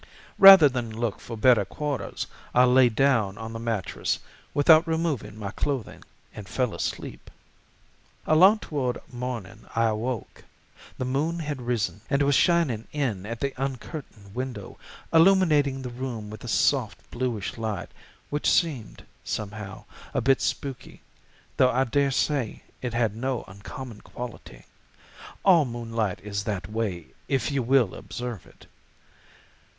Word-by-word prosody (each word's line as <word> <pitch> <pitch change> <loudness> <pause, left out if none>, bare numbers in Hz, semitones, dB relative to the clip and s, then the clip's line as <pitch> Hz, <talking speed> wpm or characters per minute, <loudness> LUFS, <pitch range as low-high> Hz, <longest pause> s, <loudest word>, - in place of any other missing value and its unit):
Rather 195 -5 +11
than 125 -4 -3
look 110 -1 -3
for 115 - -8
better 120 -2 +5
quarters 145 +8 -4 0.3
I 125 - +7
lay 125 0 +6
down 110 -5 +2
on 110 +1 -7
the 115 - -5
mattress 115 -5 -2 0.3
without 155 +3 +5
removing 155 -11 -2
my 100 -2 -5
clothing 135 -1 -3 0.3
and 105 -3 -9
fell 125 -3 -1
asleep. - - -5 1.0
"Along 185 +7 +6
toward 135 - -3
morning 120 -4 -6
I 115 0 +3
awoke. 115 +2 -4 0.5
The 130 - -2
moon 145 +6 -1
had 145 -5 -4
risen 120 -4 -2
and 140 0 +2
was 140 0 +3
shining 140 -5 +2
in 115 -10 -2
at 115 +1 -6
the 140 -1 -1
uncurtained 125 - -7
window, 125 -5 -6 0.3
illuminating 160 -6 +4
the 125 - -5
room 120 -4 -5
with 110 - -9
a - - -7
soft, - - +1
bluish 120 -5 -3
light 110 -6 -3 0.4
which 145 +1 +1
seemed, 140 - 0 0.2
somehow, 105 -2 -5 0.3
a - - +3
bit 135 +2 +3
spooky, 135 -3 -4 0.6
though 130 - +5
I 130 +1 +2
dare 140 +2 +1
say 135 -3 -1 0.2
it 120 -2 -3
had 115 -3 +1
no 130 0 -2
uncommon 105 +4 -9
quality; 115 - -9 0.8
all 175 -5 +7
moonlight 115 -4 -3
is 100 -1 -4
that 95 -5 -3
way 105 -6 -3 0.2
if 135 -2 0
you 140 -1 0
will 125 -4 +3
observe 105 +1 -6
it. - - -19
125 Hz, 140 wpm, -26 LUFS, 110-140 Hz, 1.0 s, Rather